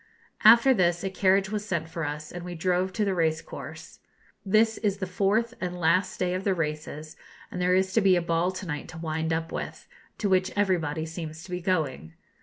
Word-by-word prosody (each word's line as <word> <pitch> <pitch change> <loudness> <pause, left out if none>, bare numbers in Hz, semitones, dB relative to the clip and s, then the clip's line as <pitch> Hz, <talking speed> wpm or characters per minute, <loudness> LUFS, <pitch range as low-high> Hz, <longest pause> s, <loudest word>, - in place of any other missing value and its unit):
After 235 +4 +8
this, 175 -5 +1
a 195 - -2
carriage 190 0 +2
was 210 -1 -2
sent 170 -6 -2
for 165 0 -5
us, 150 +1 -5
and 175 0 -7
we 175 0 -6
drove 180 +2 0
to 215 0 0
the 195 - +1
race 160 -3 +1
course. 165 - -10 0.4
This 220 +3 +3
is 200 -3 0
the 190 - -3
fourth 205 +6 +1
and 180 -1 -3
last 185 +3 +2
day 180 -1 0
of 185 +1 -2
the 195 -2 +1
races, 155 -1 -4 0.4
and 180 - -4
there 180 0 +3
is 190 0 +1
to 225 - +4
be 190 -2 +5
a 175 - +2
ball 170 +1 +1
to 185 +1 -6
night 150 -4 -4
to 160 - -10
wind 160 0 -2
up 165 0 -2
with, - - -6 0.3
to 210 - -1
which 185 -1 +2
everybody 165 -6 0
seems 160 -1 -7
to 190 - -11
be 180 0 -3
going. 150 - -1
180 Hz, 215 wpm, -27 LUFS, 160-195 Hz, 0.4 s, After